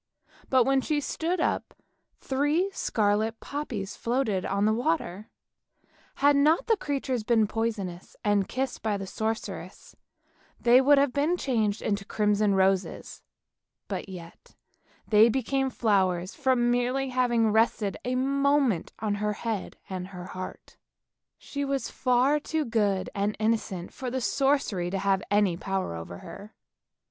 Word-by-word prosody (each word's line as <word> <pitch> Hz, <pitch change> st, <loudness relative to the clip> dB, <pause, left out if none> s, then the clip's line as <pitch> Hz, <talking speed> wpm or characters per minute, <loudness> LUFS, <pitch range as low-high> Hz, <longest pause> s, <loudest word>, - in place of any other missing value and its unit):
But 260 Hz, -2 st, +5 dB
when 270 Hz, +2 st, +2 dB
she 300 Hz, +2 st, 0 dB
stood 330 Hz, +5 st, -2 dB
up -, -, -1 dB, 0.4 s
three 295 Hz, +8 st, 0 dB
scarlet 220 Hz, -, 0 dB
poppies 225 Hz, -9 st, -5 dB
floated 230 Hz, -6 st, -1 dB
on 200 Hz, +1 st, +1 dB
the 215 Hz, -, +3 dB
water; 225 Hz, -, -1 dB, 0.9 s
had 285 Hz, +1 st, +4 dB
not 305 Hz, +10 st, +3 dB
the 455 Hz, -, +3 dB
creatures 270 Hz, -, -2 dB
been 225 Hz, -1 st, +3 dB
poisonous, 205 Hz, -5 st, -3 dB
and 205 Hz, -2 st, +2 dB
kissed 265 Hz, 0 st, -3 dB
by 215 Hz, -2 st, 0 dB
the 195 Hz, -, -5 dB
sorceress, 220 Hz, +3 st, -5 dB, 0.6 s
they 245 Hz, +2 st, +6 dB
would 285 Hz, +2 st, +5 dB
have 275 Hz, -2 st, +3 dB
been 305 Hz, +5 st, +1 dB
changed 225 Hz, -8 st, 0 dB
into 200 Hz, -2 st, -1 dB
crimson 210 Hz, -1 st, +1 dB
roses, 190 Hz, 0 st, 0 dB, 0.7 s
but -, -, -4 dB
yet 170 Hz, -3 st, -11 dB, 0.5 s
they 220 Hz, +1 st, +6 dB
became 265 Hz, +2 st, 0 dB
flowers 190 Hz, -6 st, +1 dB
from 255 Hz, -4 st, +2 dB
merely 250 Hz, +2 st, 0 dB
having 240 Hz, -3 st, +2 dB
rested 220 Hz, -2 st, +2 dB
a 250 Hz, +1 st, -1 dB
moment 275 Hz, -, +1 dB
on 215 Hz, -1 st, -1 dB
her 210 Hz, 0 st, 0 dB
head 220 Hz, -2 st, -4 dB
and 185 Hz, -1 st, -5 dB
her 180 Hz, -2 st, -9 dB
heart. 185 Hz, 0 st, -8 dB, 0.6 s
She 285 Hz, 0 st, -5 dB
was 275 Hz, -1 st, -2 dB
far 255 Hz, +4 st, +2 dB
too 310 Hz, +1 st, -2 dB
good 205 Hz, -5 st, 0 dB
and 205 Hz, +1 st, -1 dB
innocent 215 Hz, -5 st, -1 dB
for 260 Hz, -2 st, -5 dB
the 260 Hz, +2 st, -2 dB
sorcery 270 Hz, -9 st, +1 dB
to 195 Hz, -, -2 dB
have 195 Hz, -1 st, +1 dB
any 205 Hz, -4 st, +2 dB
power 195 Hz, -, -2 dB
over 85 Hz, +1 st, -7 dB
her. 210 Hz, +2 st, -10 dB
225 Hz, 140 wpm, -27 LUFS, 200-270 Hz, 0.9 s, they